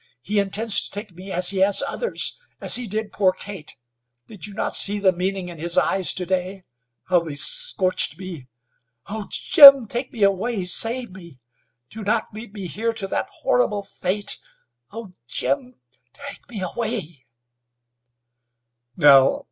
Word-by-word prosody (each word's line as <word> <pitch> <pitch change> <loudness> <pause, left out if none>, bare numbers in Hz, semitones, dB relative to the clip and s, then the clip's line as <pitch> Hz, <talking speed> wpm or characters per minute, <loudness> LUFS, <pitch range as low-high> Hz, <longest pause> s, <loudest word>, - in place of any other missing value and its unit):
He 205 +5 0
intends 200 +2 +2
to - - -2
take 205 0 -7
me 185 +3 -11
as 180 +1 +4
he 195 - -3
has 195 +1 +4
others, 475 - -2 0.2
as - - +1
he 245 -1 -3
did 215 +1 -4
poor 190 -2 +2
Kate. 185 -4 -10 0.5
did 210 -3 -9
you 205 - -12
not - - -2
see 205 +1 +2
the 195 -2 +3
meaning 185 +1 -3
in 170 -2 -10
his 170 +2 -3
eyes 190 -2 +2
to 180 - -2
day? 185 +1 -3 0.5
How 180 -1 +4
they 160 -4 -7
scorched 190 - +2
me! 175 -8 -9 0.6
Ho! 210 0 -7
Jim, 275 -4 +8
take 240 +4 -5
me 225 -4 -3
away! 200 +1 0
Save 230 +5 0
me! 170 -7 -14 0.5
Do 220 0 -8
not 215 +2 -1
leave 220 0 -9
me 200 -2 -8
here 225 +6 -3
to 220 -3 -5
that - - -3
horrible - - 0
fate? 195 +1 -2 0.5
Oh! 220 -2 -9 0.2
Jim, 125 -1 -3 0.4
take - - -10
me 220 -5 -7
away!" 185 - -5
195 Hz, 155 wpm, -22 LUFS, 180-220 Hz, 0.6 s, Jim